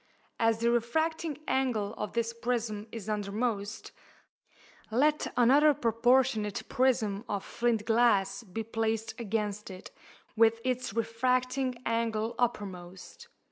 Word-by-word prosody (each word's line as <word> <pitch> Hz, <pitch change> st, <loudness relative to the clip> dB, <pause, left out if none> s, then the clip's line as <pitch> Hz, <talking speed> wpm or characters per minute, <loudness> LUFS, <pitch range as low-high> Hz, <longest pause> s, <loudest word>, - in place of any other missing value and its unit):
As 225 Hz, -1 st, +3 dB
the 235 Hz, 0 st, +3 dB
refracting 315 Hz, +6 st, 0 dB
angle 230 Hz, -6 st, 0 dB
of 210 Hz, -, -5 dB
this 230 Hz, 0 st, -1 dB
prism 230 Hz, -3 st, -2 dB
is 220 Hz, -3 st, -7 dB
undermost, 210 Hz, 0 st, -2 dB, 1.0 s
let 295 Hz, +7 st, +2 dB
another 280 Hz, +5 st, +5 dB
proportionate 235 Hz, -3 st, +2 dB
prism 225 Hz, -6 st, +1 dB
of 200 Hz, -, -2 dB
flint 235 Hz, -3 st, 0 dB
glass 225 Hz, -4 st, +3 dB
be 225 Hz, +1 st, -5 dB
placed 225 Hz, 0 st, -2 dB
against 210 Hz, -2 st, -2 dB
it, 185 Hz, -1 st, -10 dB, 0.4 s
with 225 Hz, 0 st, +4 dB
its 255 Hz, 0 st, -1 dB
refracting 255 Hz, +3 st, 0 dB
angle 230 Hz, 0 st, 0 dB
uppermost. 200 Hz, -, -4 dB
230 Hz, 110 wpm, -30 LUFS, 215-250 Hz, 1.0 s, another